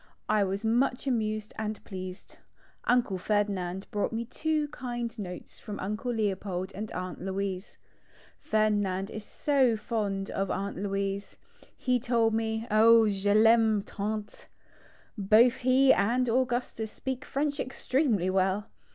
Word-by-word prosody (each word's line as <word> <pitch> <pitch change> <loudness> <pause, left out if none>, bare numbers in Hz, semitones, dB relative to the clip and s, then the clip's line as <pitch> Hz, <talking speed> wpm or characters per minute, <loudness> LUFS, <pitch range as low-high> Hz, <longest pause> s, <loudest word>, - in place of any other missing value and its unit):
I 215 -1 +3
was 195 +3 -2
much 245 +3 +1
amused 215 -4 -1
and 215 -1 -3
pleased. 185 -1 -8 0.5
Uncle 240 -6 +2
Ferdinand 195 -2 -1
brought 205 - -1
me 230 +1 -3
two 305 +4 -1
kind 240 -3 -4
notes 180 -3 -8
from 205 -1 -7
Uncle 210 +5 -3
Leopold 195 -4 -2
and 210 +2 -6
Aunt 185 0 -5
Louise. 190 0 -4 0.6
Ferdinand 205 -3 0
is 215 - -6
so 260 -2 +2
fond 205 -3 -2
of 195 -1 -2
Aunt 200 -1 -3
Louise. 195 0 -3 0.4
He 250 -1 +1
told 230 -2 +2
me: 220 0 -1
*' - - -9
Oh, 225 +1 +6
je 200 0 0
Taime 220 -1 +5
tant! 210 +1 -5 0.4
" - - -29
Both 220 +5 +5
he 260 +2 +5
and 245 +5 +2
Augustus 240 -2 -1
speak 260 -1 -4
French 285 +1 -2
extremely 255 - 0
well. 190 +2 0
215 Hz, 135 wpm, -29 LUFS, 195-240 Hz, 0.6 s, Oh